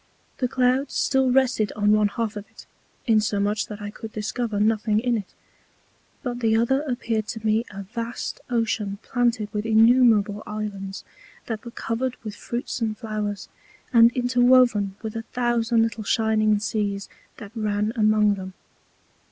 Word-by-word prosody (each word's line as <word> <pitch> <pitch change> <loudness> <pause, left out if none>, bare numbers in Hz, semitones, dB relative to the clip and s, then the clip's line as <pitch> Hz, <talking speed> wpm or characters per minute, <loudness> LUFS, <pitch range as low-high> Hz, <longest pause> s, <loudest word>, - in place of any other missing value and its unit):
The 255 - +1
Clouds 255 +2 +1
still 265 -1 +2
rested 250 -5 +2
on 210 0 +2
one 210 0 +4
Half 220 +1 -3
of 205 0 -8
it, - - -15 0.4
insomuch 210 -2 +1
that 210 -1 -8
I 205 - -5
could 220 +1 -9
discover 215 0 -3
nothing 215 0 +2
in 240 +1 0
it: 205 -4 -6 0.9
But 245 -2 -3
the 225 -2 +2
other 235 +5 +2
appeared 235 -6 -2
to 220 -1 -6
me 220 +2 +2
a 200 0 -7
vast 230 +4 -5
Ocean 225 -4 -1
planted 240 -4 0
with 210 0 -2
innumerable 225 -2 +4
Islands, 200 -2 -5 0.4
that 225 -2 -5
were 235 - -7
covered 235 +2 -3
with 215 -2 -5
Fruits 240 0 -5
and 215 -2 -1
Flowers, 210 -3 -4 0.5
and 230 0 +7
interwoven 245 -5 +3
with 220 0 -5
a 225 - -2
thousand 235 -1 +2
little 225 -1 -3
shining 215 0 +2
Seas 205 -2 -2 0.3
that 205 -3 -10
ran 210 -1 -1
among 215 -2 +3
them. 190 -1 -7
220 Hz, 150 wpm, -24 LUFS, 210-240 Hz, 0.9 s, and